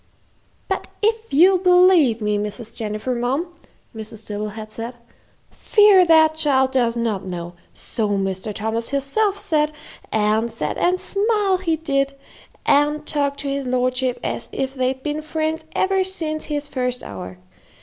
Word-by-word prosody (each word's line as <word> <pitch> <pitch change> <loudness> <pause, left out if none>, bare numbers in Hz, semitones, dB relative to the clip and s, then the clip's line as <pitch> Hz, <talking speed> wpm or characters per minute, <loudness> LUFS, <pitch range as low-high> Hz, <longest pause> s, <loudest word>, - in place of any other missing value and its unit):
"But - - -2 0.2
if 450 +1 0
you'll 365 +6 +5
believe 360 - +5
me, 210 0 +1
Mrs. 210 +2 -5
Jennifer, 215 +3 -3
mum," 265 +9 -2 0.4
Mrs. 220 0 -8
Dibble 210 0 -4
had 215 +1 -9
said, 230 +3 -6 0.6
"fear 415 -4 +5
that 320 -2 +5
child 275 -4 +2
does 240 -3 +1
not 225 -5 -1
know 175 -2 -6 0.2
so 215 -2 -3
Mr. 195 0 -2
Thomas 220 +3 -2
hisself 385 +10 0
says; 310 -7 +1 0.4
an' 215 +2 +1
set 230 - -3
an' 360 +1 +2
smile 405 -1 +1
he 335 -3 0
did, 275 -3 -1 0.5
an' 295 +1 +3
talked 285 -2 -1
to 285 - -5
his 275 -1 -2
lordship 255 0 0
as - - -4
if 265 0 -3
they'd 260 0 -1
been 300 +1 -2
friends 315 +1 -2
ever 380 0 +2
since 320 -5 -3
his 295 -1 -3
first 250 -3 -2
hour. 90 -2 -8
275 Hz, 150 wpm, -21 LUFS, 225-320 Hz, 0.6 s, you'll